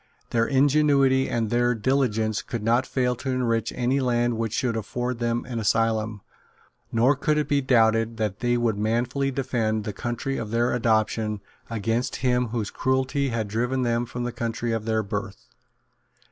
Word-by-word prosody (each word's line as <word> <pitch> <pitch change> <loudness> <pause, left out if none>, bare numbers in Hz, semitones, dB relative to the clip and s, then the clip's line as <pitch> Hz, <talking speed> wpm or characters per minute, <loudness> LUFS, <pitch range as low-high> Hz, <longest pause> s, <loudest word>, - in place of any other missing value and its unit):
Their 115 -1 +2
ingenuity 140 -1 +3
and 115 -3 -1
their 120 0 +2
diligence 110 -3 0
could 115 -3 -5
not 120 +4 +2
fail 125 -1 0
to 135 - -5
enrich 120 -3 0
any 125 +2 +1
land 120 -2 +1
which 115 -1 -2
should 120 -2 0
afford 120 +3 -3
them 120 0 -1
an 120 -3 -3
asylum; 110 -1 0 0.7
nor 120 +5 +3
could 150 +2 0
it 150 - 0
be 145 -1 +2
doubted 115 -3 +3
that 105 -3 -2
they 120 0 +1
would 115 -4 0
manfully 120 +5 0
defend 120 -5 -1
the 105 - -4
country 120 +6 -3
of 110 - -4
their 120 +2 +1
adoption 110 -2 +1 0.3
against 115 +2 -1
him 125 -1 +2
whose 110 -2 -3
cruelty 130 +1 0
had 115 -3 -2
driven 125 +5 -1
them 120 0 0
from 120 +1 -5
the 120 - -2
country 115 0 -3
of 115 -1 -2
their 110 -1 +1
birth. 100 0 -5
120 Hz, 170 wpm, -25 LUFS, 110-130 Hz, 0.7 s, ingenuity